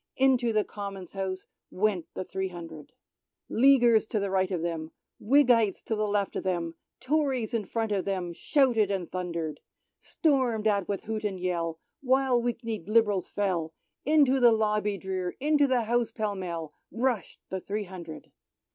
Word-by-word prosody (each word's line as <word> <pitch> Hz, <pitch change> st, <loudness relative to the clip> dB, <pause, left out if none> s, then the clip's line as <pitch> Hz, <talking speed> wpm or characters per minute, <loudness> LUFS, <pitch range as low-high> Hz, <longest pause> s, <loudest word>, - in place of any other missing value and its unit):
" -, -, -61 dB
Into 245 Hz, -3 st, +3 dB
the 215 Hz, -1 st, +2 dB
Common's 195 Hz, -4 st, -7 dB
House 190 Hz, -1 st, -4 dB, 0.2 s
went 190 Hz, -3 st, 0 dB
the -, -, -3 dB
three 190 Hz, +1 st, -3 dB
hundred. 165 Hz, -4 st, -9 dB, 0.6 s
Leaguers 240 Hz, -4 st, +5 dB
to 205 Hz, -4 st, -1 dB
right 190 Hz, -1 st, +2 dB
of 175 Hz, -4 st, -2 dB
them, 165 Hz, -2 st, -3 dB, 0.3 s
Whiggites 240 Hz, -4 st, +3 dB
to 220 Hz, -, -2 dB
left 205 Hz, -2 st, 0 dB
of -, -, -1 dB
them, 170 Hz, -3 st, -1 dB, 0.3 s
Tories 265 Hz, -5 st, 0 dB
in 225 Hz, -3 st, -1 dB
front 225 Hz, +3 st, -2 dB
of 195 Hz, -2 st, 0 dB
them, 185 Hz, -3 st, -2 dB
shouted 240 Hz, -, +2 dB
and 190 Hz, -4 st, -3 dB
thundered. 170 Hz, -4 st, -3 dB, 0.4 s
Stormed 255 Hz, -8 st, +1 dB
at 200 Hz, -4 st, +2 dB
with 200 Hz, -2 st, -3 dB
hoot 220 Hz, 0 st, -4 dB
and 195 Hz, -3 st, -2 dB
yell, 170 Hz, -3 st, -2 dB, 0.2 s
while 260 Hz, -2 st, +3 dB
weak 240 Hz, 0 st, -2 dB
kneed 220 Hz, -7 st, -4 dB
Lib'rals 215 Hz, -4 st, +2 dB
fell. 180 Hz, -6 st, -1 dB, 0.3 s
Into 280 Hz, -3 st, +4 dB
the 240 Hz, -2 st, +7 dB
lobby 210 Hz, -2 st, +1 dB
drear, 185 Hz, -2 st, -3 dB
into 290 Hz, 0 st, +3 dB
the 255 Hz, -3 st, +2 dB
House 235 Hz, +1 st, +1 dB
pell 215 Hz, -2 st, -2 dB
mell, 170 Hz, -5 st, -5 dB, 0.2 s
rush'd 235 Hz, -4 st, -1 dB
the 190 Hz, -, -3 dB
three 210 Hz, +3 st, -3 dB
hundred. 175 Hz, -4 st, -10 dB
205 Hz, 165 wpm, -28 LUFS, 185-235 Hz, 0.6 s, the